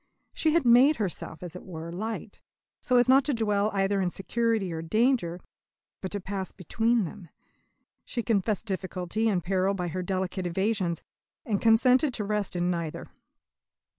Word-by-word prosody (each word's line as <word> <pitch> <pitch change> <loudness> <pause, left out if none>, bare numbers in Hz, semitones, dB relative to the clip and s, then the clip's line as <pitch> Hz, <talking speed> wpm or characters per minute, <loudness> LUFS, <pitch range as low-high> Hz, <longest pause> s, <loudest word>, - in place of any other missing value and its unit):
She 315 -1 +1
had 335 - +3
made 250 +6 +6
herself, 180 - -4
as 175 -1 -7
it 180 - -8
were, 165 -2 -7
light, 215 +6 -5 0.4
so 250 - +2
as 245 - +4
not 265 +2 +6
to 290 - +1
dwell 210 -2 +1
either 195 0 +1
in 180 - +1
security 220 0 -1
or 160 - -4
danger, 210 -1 +1 0.6
but 190 - -4
to 205 - -1
pass 195 0 -4
between 225 +5 0
them. 175 0 -10 0.7
She 235 - -4
confessed 215 -2 0
difficulty 190 +2 -2
and 180 -5 0
peril 190 +1 +1
by 180 -2 -3
her 185 +3 -3
delicate 185 0 -2
evasions, 190 -1 -1 0.4
and 210 -6 -1
consented 250 +4 +4
to 210 - -2
rest 205 -2 -1
in 175 0 +1
neither. 170 -3 -4
200 Hz, 165 wpm, -27 LUFS, 180-225 Hz, 0.7 s, made